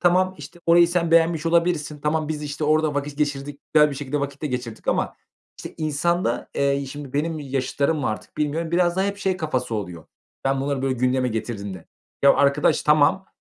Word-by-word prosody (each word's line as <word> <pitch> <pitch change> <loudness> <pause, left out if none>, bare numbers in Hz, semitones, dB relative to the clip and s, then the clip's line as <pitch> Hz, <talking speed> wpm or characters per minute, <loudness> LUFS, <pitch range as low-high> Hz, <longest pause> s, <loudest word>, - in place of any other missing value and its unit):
"Tamam, 185 +1 +3
işte, 150 +4 -11
orayı 170 0 +6
sen 170 -1 0
beğenmiş 165 -1 +3
olabilirsin. 165 -3 +1
Tamam, 150 +1 0
biz, 150 -1 -3
işte, 145 +1 -4
orada 155 0 +2
vakit 145 +1 -3
geçirdik, 145 -1 -2
güzel 150 -1 +6
bir - - -5
şekilde 145 +1 -3
vakit 140 +1 -5
de - - 0
geçirdik 125 -4 -5
ama..." - - 0 0.6
İnsanda, 155 -2 0
eee, 140 0 +1
şimdi 145 -1 -8
benim 155 +3 -1
yaşıtlarım 140 +2 -1
mı 135 - -1
artık 110 - -6
bilmiyorum, 155 +2 -1
biraz 175 0 +2
daha 190 - +2
hep 200 0 -2
şey 190 -2 -1
kafası 130 -8 -2
oluyor. 90 -6 -5 0.4
Ben 135 0 +1
bunları, 140 -1 -2
böyle, 135 -1 +1
gündeme 125 +1 +1
getirdiğimde, 100 -5 -5 0.4
ya 140 - +7
arkadaş, 140 +1 +3
tamam, 150 +5 +3
145 Hz, 185 wpm, -23 LUFS, 135-165 Hz, 0.6 s, ya